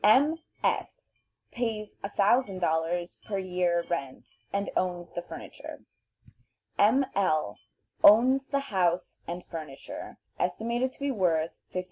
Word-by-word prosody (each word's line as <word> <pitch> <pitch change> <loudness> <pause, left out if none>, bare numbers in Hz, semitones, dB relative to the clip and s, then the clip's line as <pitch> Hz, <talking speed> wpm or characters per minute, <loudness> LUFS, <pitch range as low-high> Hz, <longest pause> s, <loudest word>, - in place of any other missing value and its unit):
M. 285 +10 +5 0.2
S. - - -1 0.4
pays 220 -3 -3
$1000 185 -6 +1
per 200 - -3
year 180 -2 +1
rent, 135 -7 -4 0.2
and 200 0 -1
owns 175 -2 -1
the 175 - -4
furniture. - - -9 1.0
M. 245 +7 +5
L. 155 - +1 0.4
owns 260 +6 +7
the 280 -2 -2
house 180 -2 +1
and 175 +1 -4
furniture, 155 -5 -8 0.2
estimated 235 +8 0
to - - -19
be 280 0 0
worth 170 -8 0
$15,000. 185 - -1
190 Hz, 115 wpm, -29 LUFS, 175-235 Hz, 1.0 s, owns